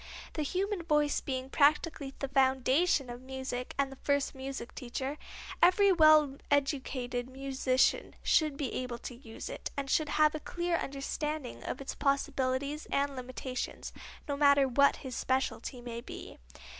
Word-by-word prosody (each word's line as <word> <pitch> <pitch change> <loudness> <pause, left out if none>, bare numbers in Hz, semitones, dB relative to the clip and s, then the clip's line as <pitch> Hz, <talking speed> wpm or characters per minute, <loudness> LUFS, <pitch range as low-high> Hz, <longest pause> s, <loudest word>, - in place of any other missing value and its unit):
The 310 - -2
human 375 +5 -1
voice 300 -3 +2
being 260 -1 -4
practically 295 -1 +2
the 275 - -3
foundation 270 +3 +3
of 240 0 -7
music 260 -1 -5
and 275 -1 +1
the - - -8
first 285 -1 +1
music 265 -2 -6
teacher, 265 +4 -4 0.4
every 385 +3 +6
well 310 -5 +6
educated 260 -3 0
musician 265 -1 +1
should 305 -3 +3
be 275 -5 -3
able 250 -2 -3
to 245 - -7
use 235 -2 -9
it, - - -5
and 275 -1 -2
should 310 -2 +2
have 305 0 +4
a 310 - -3
clear 345 +2 -2
understanding 285 -1 -3
of - - -4
its 275 - -5
possibilities 275 +1 0
and 280 0 +1
limitations, 255 0 -5 0.3
no 285 - -1
matter 280 -1 +5
what 280 +3 +4
his 255 -2 -5
specialty 260 -1 -1
may 235 -1 -6
be. - - -9
275 Hz, 150 wpm, -31 LUFS, 260-300 Hz, 0.4 s, every